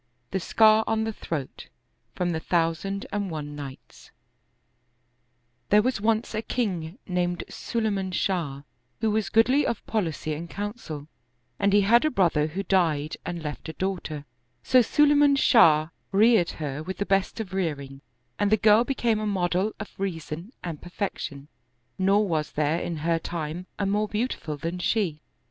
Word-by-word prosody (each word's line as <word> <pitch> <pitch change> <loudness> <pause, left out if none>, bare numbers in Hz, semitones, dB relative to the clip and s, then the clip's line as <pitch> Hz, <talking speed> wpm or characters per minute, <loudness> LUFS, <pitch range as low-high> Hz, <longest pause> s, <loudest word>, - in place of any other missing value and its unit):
TAe 190 - 0
Scar 220 +4 +5
on 220 0 +1
the 225 0 -2
Throat 150 -9 -6 0.5
From 180 -1 0
the 160 -1 -2
Arabic 175 +4 0 2.6
'pHERE 210 +1 +6
was 250 -4 0
once 220 +1 +1
a 215 - -1
king 185 -8 -2
named 180 -1 -1
Sulayman 205 -5 -2
Shah, 165 -7 -1 0.4
who 220 - +2
was 215 0 0
goodly 255 +6 +4
of 230 - -2
policy 165 -7 -2
and 165 +3 -6
counsel, 200 - -6 0.5
and 200 - +3
he 205 +1 +5
had 230 +5 +5
a 310 - +3
brother 170 - +2
who 185 +5 -4
died 160 -6 +1
and 175 -2 -4
left 150 +1 -5
a - - -5
daughter; 170 -6 -3 0.4
so 255 - +5
Sulayman 290 +3 +4
Shah 155 - +5 0.2
reared 210 -2 +5
her 150 -2 -4
with 185 +3 -5
the 200 - -1
best 195 +2 +1
of 195 -4 -5
rearing 140 -7 -3 0.4
and 205 0 +2
the 215 - +5
girl 215 +2 +5
became 240 -4 0
a 215 - -2
model 185 +1 0
of 215 - -7
rea 195 -4 -1
son 160 +6 -7
and 165 -4 -5
perfection, 175 -6 -5 0.5
nor 200 +2 +3
was 155 -4 -1
there 155 +2 +1
in 170 -2 -3
her 165 -1 +2
time 170 +2 -5
a 200 - -1
more 205 +2 +1
beau 215 +3 0
tiful 155 - -5
than 165 +5 -4
she. 180 -6 0
190 Hz, 160 wpm, -26 LUFS, 160-215 Hz, 2.6 s, pHERE